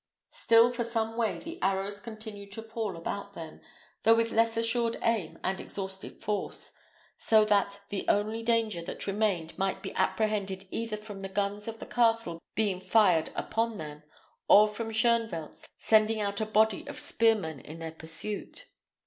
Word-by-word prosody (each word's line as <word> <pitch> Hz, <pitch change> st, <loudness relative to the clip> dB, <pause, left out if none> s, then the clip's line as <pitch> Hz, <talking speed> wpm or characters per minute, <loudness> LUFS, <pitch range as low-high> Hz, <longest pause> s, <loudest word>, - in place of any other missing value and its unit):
Still 230 Hz, +2 st, +5 dB
for 240 Hz, -1 st, -1 dB
some 225 Hz, -1 st, -2 dB
way 225 Hz, -3 st, 0 dB
the 335 Hz, +1 st, -8 dB
arrows 195 Hz, +1 st, 0 dB
continued 215 Hz, -2 st, -9 dB
to 225 Hz, -, -6 dB
fall 220 Hz, -5 st, -4 dB
about 200 Hz, +4 st, -5 dB
them, 160 Hz, -1 st, -9 dB, 0.4 s
though 225 Hz, +1 st, +6 dB
with 230 Hz, 0 st, +1 dB
less 225 Hz, 0 st, +2 dB
assured 230 Hz, 0 st, +1 dB
aim 220 Hz, -8 st, 0 dB
and 190 Hz, +1 st, -1 dB
exhausted 190 Hz, -1 st, -7 dB
force; 210 Hz, -1 st, -3 dB, 0.5 s
so 220 Hz, -1 st, +5 dB
that 200 Hz, -1 st, +1 dB
the 200 Hz, -, -4 dB
only 215 Hz, +2 st, +1 dB
danger 225 Hz, -5 st, +1 dB
that 170 Hz, -, -5 dB
remained 195 Hz, -5 st, 0 dB
might 195 Hz, 0 st, -1 dB
be -, -, -5 dB
apprehended 195 Hz, -1 st, 0 dB
either 225 Hz, -2 st, -3 dB
from 210 Hz, -2 st, -9 dB
the 195 Hz, 0 st, -5 dB
guns 205 Hz, +2 st, -2 dB
of 225 Hz, 0 st, -5 dB
the -, -, -8 dB
castle 230 Hz, -8 st, +1 dB, 0.2 s
being 205 Hz, -4 st, +1 dB
fired 185 Hz, -4 st, +3 dB
upon 225 Hz, 0 st, -1 dB
them, 150 Hz, -2 st, -7 dB, 0.5 s
or 210 Hz, +1 st, +8 dB
from 220 Hz, +2 st, -5 dB
Shoenvelt 225 Hz, -7 st, 0 dB
sending 220 Hz, 0 st, +3 dB
out 200 Hz, 0 st, -1 dB
a 215 Hz, -, -1 dB
body 215 Hz, -1 st, +3 dB
of -, -, -6 dB
spearmen 210 Hz, -10 st, +2 dB
in 155 Hz, +5 st, -10 dB
their 165 Hz, -1 st, -6 dB
pursuit. 165 Hz, +6 st, -4 dB
210 Hz, 165 wpm, -29 LUFS, 195-225 Hz, 0.5 s, or